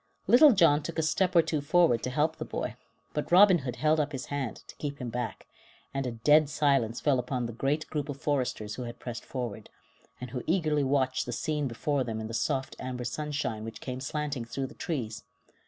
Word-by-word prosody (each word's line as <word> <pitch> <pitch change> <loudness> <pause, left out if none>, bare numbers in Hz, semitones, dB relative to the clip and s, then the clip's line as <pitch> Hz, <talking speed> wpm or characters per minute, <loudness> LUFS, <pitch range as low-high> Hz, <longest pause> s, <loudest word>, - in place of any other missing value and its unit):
Little 280 +4 +8
John 165 -7 +5
took 170 +3 -6
a 160 - +1
step 180 +4 +1
or 170 - +7
two 155 -2 -1
forward 150 -5 +3
to - - -2
help 150 +4 0
the - - -4
boy, 120 - -4 0.4
but 150 - -3
Robin 185 0 +7
Hood 130 -3 -4
held 155 +1 +2
up 150 0 -1
his 135 - -4
hand 135 -5 -3
to - - -12
keep 145 -1 -4
him 125 -3 -5
back, 125 0 -4 0.5
and 135 -1 -1
a - - -2
dead 150 +6 +4
silence 135 -7 +1
fell 140 -4 +2
upon 125 0 -2
the 115 - -5
great 145 +6 0
group 150 -1 -2
of 140 -1 -5
foresters 130 -8 -1
who 125 - -5
had 120 - -7
pressed 120 -2 -6
forward, 120 -5 -5 0.5
and 125 -1 -7
who 125 -1 -3
eagerly 155 -4 +2
watched 130 -2 +1
the - - -3
scene 150 +3 -1
before 135 +3 -1
them 115 -2 -4
in 110 - -4
the 115 - -6
soft, 125 +4 -1
amber 125 -1 -4
sunshine 140 -4 -3
which 115 0 -7
came 125 0 -5
slanting 145 -2 -3
through 135 +3 -3
the - - -9
trees. 120 -10 -4
140 Hz, 220 wpm, -29 LUFS, 125-150 Hz, 0.5 s, Little